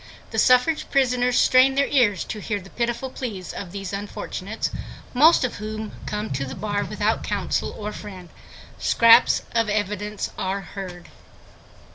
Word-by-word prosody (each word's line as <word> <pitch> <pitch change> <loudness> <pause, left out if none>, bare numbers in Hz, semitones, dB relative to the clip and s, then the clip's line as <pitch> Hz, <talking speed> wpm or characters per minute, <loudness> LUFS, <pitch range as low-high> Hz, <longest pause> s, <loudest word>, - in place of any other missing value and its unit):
The - - -1
suffrage 255 +5 +3
prisoners 250 -2 +2
strain 260 +1 +5
their 280 0 +3
ears 230 -8 +2
to 215 - -6
hear 205 0 -3
the 195 0 -14
pitiful 240 +2 -2
pleas 205 -10 -6
of 180 -3 -7
these 195 0 -6
unfortunates, 200 +1 -4 0.4
most 300 +5 +6
of 250 - -4
whom 215 +1 -5 0.2
come 210 +1 -3
to 135 +1 -2
the 135 0 -6
bar 205 -1 -2
without - - -1
counsel - - -1
or 210 0 -5
friend. 185 -4 -9 0.5
Scraps 230 +1 +5
of 230 -2 +1
evidence 210 0 -2
are 190 +1 -2
heard. 180 -2 -9
210 Hz, 150 wpm, -23 LUFS, 195-245 Hz, 0.5 s, most